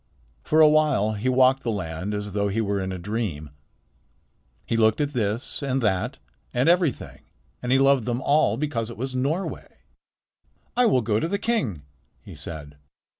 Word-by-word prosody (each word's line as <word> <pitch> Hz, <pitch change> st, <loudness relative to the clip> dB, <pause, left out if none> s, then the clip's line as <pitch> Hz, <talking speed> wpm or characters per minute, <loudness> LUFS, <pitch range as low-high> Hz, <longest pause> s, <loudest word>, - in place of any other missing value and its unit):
For 155 Hz, +1 st, +3 dB
a 155 Hz, -, +9 dB
while 150 Hz, -9 st, +3 dB
he 110 Hz, +5 st, -1 dB
walked 130 Hz, +1 st, +4 dB
the 120 Hz, -, -3 dB
land 95 Hz, -1 st, -3 dB
as 105 Hz, -1 st, -5 dB
though 100 Hz, 0 st, 0 dB
he 100 Hz, +3 st, -1 dB
were 100 Hz, -2 st, 0 dB
in 95 Hz, 0 st, -3 dB
a 95 Hz, -, -4 dB
dream. 90 Hz, -6 st, -4 dB, 1.1 s
He -, -, -1 dB
looked 110 Hz, -1 st, +3 dB
at 145 Hz, -1 st, -1 dB
this 110 Hz, +2 st, -2 dB
and 135 Hz, -1 st, 0 dB
that 110 Hz, +6 st, 0 dB, 0.3 s
and 125 Hz, +3 st, +1 dB
everything 175 Hz, -4 st, +1 dB, 0.4 s
and 125 Hz, -, -2 dB
loved 135 Hz, -3 st, +4 dB
them 120 Hz, 0 st, -1 dB
all 145 Hz, +4 st, +2 dB
because 125 Hz, -6 st, -2 dB
it 115 Hz, -, -9 dB
was 130 Hz, +3 st, -4 dB
Norway. 145 Hz, +9 st, -2 dB, 1.1 s
"I 245 Hz, 0 st, +4 dB
will 130 Hz, -, +3 dB
go 110 Hz, -1 st, 0 dB
to 165 Hz, -, -1 dB
the 200 Hz, -, -1 dB
king," 145 Hz, -, -1 dB, 0.4 s
he -, -, -12 dB
said. 75 Hz, -3 st, -8 dB
120 Hz, 175 wpm, -24 LUFS, 100-140 Hz, 1.1 s, a